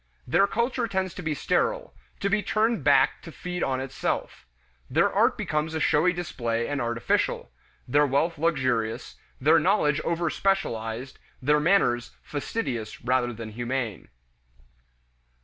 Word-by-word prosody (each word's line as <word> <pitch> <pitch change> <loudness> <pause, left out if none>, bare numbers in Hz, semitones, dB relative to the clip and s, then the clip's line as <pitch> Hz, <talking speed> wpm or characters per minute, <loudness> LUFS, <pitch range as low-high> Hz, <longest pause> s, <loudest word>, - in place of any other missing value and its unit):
Their 200 - +3
culture 235 +2 0
tends 190 -3 -2
to - - -7
be 155 -1 -2
sterile, - - 0 0.3
to 200 - +1
be 210 +1 +2
turned 220 +1 +1
back 140 -1 +4
to 165 - -10
feed 180 +2 -5
on 130 -1 0
itself; 130 - -3 0.4
their - - +2
art - - +3
becomes 155 +1 -2
a - - 0
showy 155 +3 +3
display 120 -10 -2
and 145 -1 -2
artificial; 115 - 0 0.4
their 145 +3 +4
wealth 145 +4 0
luxurious; 130 -8 0 0.2
their 155 +5 +5
knowledge 155 -4 +2
overspecialized; 155 - -1 0.2
their 150 +3 +3
manners 150 -8 +2
fastidious 135 - -4
rather 125 0 +1
than 115 -1 -7
humane. 120 -2 -3
150 Hz, 130 wpm, -26 LUFS, 120-180 Hz, 0.4 s, their